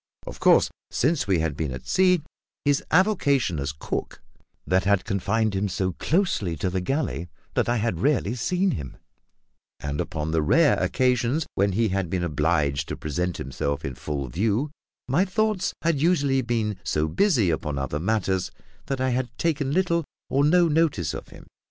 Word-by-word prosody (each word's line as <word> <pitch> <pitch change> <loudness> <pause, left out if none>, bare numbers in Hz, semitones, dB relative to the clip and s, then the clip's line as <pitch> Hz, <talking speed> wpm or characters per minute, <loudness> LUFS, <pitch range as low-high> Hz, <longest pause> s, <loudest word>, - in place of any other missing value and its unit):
Of - - -8
course, - - +5 0.2
since 145 -2 +1
we 95 -3 +3
had 80 -3 -1
been 75 -2 -2
at 65 0 -7
sea, 180 -4 +3 0.4
his 145 -1 +2
avocation 145 - +2
as 70 +2 -2
cook 75 - -5 0.5
had 95 +1 +2
confined 105 +1 0
him 100 +1 0
so 95 0 -1
closely 125 - 0
to 90 +4 -2
the 95 0 -1
galley 90 - -2 0.2
that - - +1
I 120 - +2
had 105 -6 -1
rarely 125 - +1
seen 180 +10 0
him; 70 -6 -6 0.8
and 75 0 -3
upon 80 0 -3
the 80 -1 +2
rare 145 - +4
occasions 125 +3 +1
when 100 0 +1
he 110 +2 +2
had 95 -2 -1
been 90 0 -1
obliged 75 -3 0
to - - -5
present 90 +4 -2
himself 70 +2 -3
in 70 - -3
full 70 +1 -4
view 110 - 0 0.4
my 145 +8 +3
thoughts 200 0 0
had 165 -4 +1
usually 145 -6 +3
been 115 -4 -1
so 75 +1 0
busy 120 - +2
upon 75 -2 -2
other 70 +2 -2
matters 95 0 0 0.4
that 135 -1 -2
I 130 0 +1
had 125 0 -1
taken 145 -5 0
little 170 0 +1 0.3
or 140 +1 +3
no 170 +3 +5
notice 150 - +1
of - - -7
him. - - -14
110 Hz, 170 wpm, -25 LUFS, -, 0.8 s, course